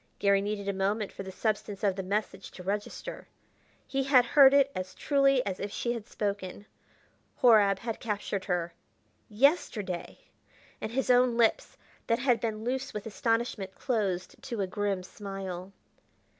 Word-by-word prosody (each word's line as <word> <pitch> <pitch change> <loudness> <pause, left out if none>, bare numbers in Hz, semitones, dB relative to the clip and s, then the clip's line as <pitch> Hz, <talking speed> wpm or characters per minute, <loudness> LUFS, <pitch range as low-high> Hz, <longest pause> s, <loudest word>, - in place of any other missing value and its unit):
Garry 200 -1 +3
needed 205 0 -3
a 200 - 0
moment 200 +2 -1
for - - -8
the 190 -1 -7
substance 210 0 -2
of 195 -2 +2
the 195 - -3
message 200 +3 -3
to 180 - -11
register. 205 +2 -4 0.6
He 270 -1 -1
had 260 -3 +5
heard 270 +2 +7
it 280 0 +4
as 185 0 -5
truly 275 -2 +3
as 190 -2 -3
if 200 - -4
she 240 +3 -1
had 230 -3 -7
spoken: 200 -1 -4 0.8
Horab 210 -5 +6
had 225 +2 -5
captured 205 -3 -3
her 175 -2 -1 0.6
yesterday!... 210 - +1 0.6
And 215 - -4
his 260 +1 +1
own 245 -1 +4
lips 230 -2 +2 0.3
that 230 - +3
had 245 -2 +2
been 220 -2 -3
loose 260 +2 -3
with 210 - -4
astonishment 225 -3 -1
closed 200 -8 -2
to 240 -6 -4
a - - +1
grim 200 -1 -2
smile. 190 -2 -7
210 Hz, 155 wpm, -29 LUFS, 195-240 Hz, 0.8 s, heard